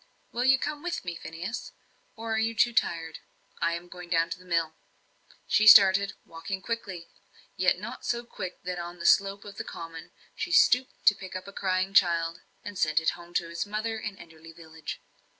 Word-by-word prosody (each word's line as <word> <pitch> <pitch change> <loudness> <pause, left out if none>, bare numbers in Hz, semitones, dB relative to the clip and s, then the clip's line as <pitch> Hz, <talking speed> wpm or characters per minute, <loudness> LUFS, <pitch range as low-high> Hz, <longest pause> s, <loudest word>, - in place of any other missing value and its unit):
"Will 245 +2 -1
you 265 +1 +6
come 295 +2 -4
with 345 - -4
me, 170 - -3
Phineas? 170 +8 -6 0.4
Or 225 -1 -4
are 220 - +1
you 225 +1 0
too 240 +2 +3
tired? 165 -6 -1 0.4
I 170 0 +1
am 170 +1 -8
going 180 0 -10
down 165 -1 +2
to - - -4
the 185 - -16
mill." 165 -2 0 0.7
She 215 - +3
started, 200 -1 +8
walking 165 +4 -6
quickly 195 -7 -5 0.4
yet 180 -1 +3
not 230 +7 -8
so 240 0 -1
quick 185 -5 -7
but 180 - -3
that 180 - -4
on 175 +1 -6
the 170 - -7
slope 195 +1 +3
of 205 0 -10
the - - -3
common 165 -1 -9 0.3
she 360 - -4
stooped 255 -5 +3
to - - +8
pick 190 -2 -9
up 185 +1 -6
a 200 - -10
crying 190 0 -1
child, 170 -3 +3 0.2
and 205 -2 -6
send 155 0 +3
it 160 - +1
home 175 0 -13
to 170 - 0
its 170 +4 -3
mother 220 +2 -3
in 210 -3 -6
Enderley 165 -1 -13
village. 160 -2 -8
185 Hz, 205 wpm, -28 LUFS, 170-215 Hz, 0.7 s, started